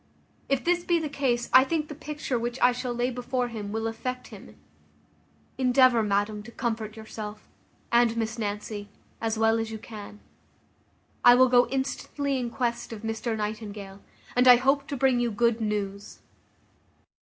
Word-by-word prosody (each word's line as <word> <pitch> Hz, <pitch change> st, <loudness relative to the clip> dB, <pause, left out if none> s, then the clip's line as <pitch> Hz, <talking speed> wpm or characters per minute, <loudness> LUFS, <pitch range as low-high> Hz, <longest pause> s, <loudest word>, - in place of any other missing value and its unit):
If 275 Hz, -1 st, +1 dB
this 350 Hz, 0 st, +1 dB
be 345 Hz, -1 st, +2 dB
the 315 Hz, -2 st, -2 dB
case, 250 Hz, -4 st, 0 dB
I 260 Hz, -, +9 dB
think 305 Hz, +2 st, -1 dB
the 300 Hz, -, -7 dB
picture 295 Hz, -4 st, -4 dB
which 240 Hz, +2 st, -3 dB
I 245 Hz, -, +5 dB
shall 250 Hz, 0 st, -4 dB
lay 240 Hz, +1 st, -1 dB
before 250 Hz, 0 st, -2 dB
him 210 Hz, -3 st, -6 dB
will 225 Hz, +1 st, -2 dB
affect 250 Hz, +3 st, -4 dB
him. -, -, -12 dB, 1.0 s
Endeavour, 255 Hz, -2 st, +5 dB
madam, 205 Hz, 0 st, 0 dB
to 215 Hz, -, -11 dB
comfort 225 Hz, -3 st, -3 dB
yourself, 215 Hz, -1 st, -8 dB, 0.4 s
and 235 Hz, -1 st, +3 dB
Miss 225 Hz, +1 st, -2 dB
Nancy, 205 Hz, -1 st, -4 dB, 0.3 s
as 225 Hz, -1 st, -1 dB
well 225 Hz, +1 st, +3 dB
as 225 Hz, 0 st, -2 dB
you 220 Hz, -, -5 dB
can. 210 Hz, -1 st, -10 dB, 1.0 s
I 245 Hz, -, +9 dB
will 255 Hz, +1 st, +5 dB
go 245 Hz, 0 st, +5 dB
instantly 275 Hz, +1 st, -2 dB
in 245 Hz, -1 st, -2 dB
quest 235 Hz, -1 st, -2 dB
of 225 Hz, -1 st, -8 dB
Mr 225 Hz, 0 st, -2 dB
Nightingale; 210 Hz, -2 st, -5 dB, 0.3 s
and 250 Hz, +1 st, +4 dB
I 250 Hz, -, +11 dB
hope 275 Hz, +3 st, +1 dB
to 285 Hz, -3 st, -4 dB
bring 260 Hz, -1 st, +3 dB
you 240 Hz, -1 st, +1 dB
good 235 Hz, +1 st, +1 dB
news." 205 Hz, -1 st, -3 dB
235 Hz, 165 wpm, -27 LUFS, 220-255 Hz, 1.0 s, I